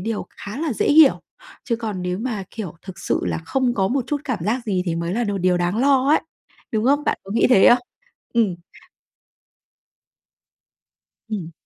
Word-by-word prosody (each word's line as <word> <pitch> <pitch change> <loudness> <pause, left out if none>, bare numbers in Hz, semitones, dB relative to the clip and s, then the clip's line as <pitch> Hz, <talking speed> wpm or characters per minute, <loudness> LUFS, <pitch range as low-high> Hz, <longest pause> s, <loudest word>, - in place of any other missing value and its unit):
điều 220 +2 -3
khá 205 +4 -9
là 320 -4 -1
dễ - - -1
hiểu, 295 -2 +6 0.4
chứ 235 -4 -1
còn 215 -6 -4
nếu 180 +1 -2
mà, 220 -5 -3
kiểu, 210 -8 -6
thực 190 -2 -10
sự - - -1
là - - -1
không 245 +9 -1
có 190 -3 +1
một 260 -1 0
chút 290 -1 -2
cảm 255 -5 -2
giác 235 +4 -1
gì 185 -3 0
thì 170 - 0
mới 170 +1 -2
là 240 +1 0
đồ 200 -2 -2
điều 180 0 +2
đáng 175 +5 0
lo 270 0 +3
ấy, 310 - +4 0.5
đúng 220 0 0
không? 285 +3 +2
Bạn - - 0
có 195 - -11
nghĩ 230 - +3
thế 200 -7 +6
không? 245 - +6 0.6
Ừm. 210 -7 +2 2.7
Ừm. 180 -6 -4
220 Hz, 190 wpm, -21 LUFS, 190-255 Hz, 2.7 s, hiểu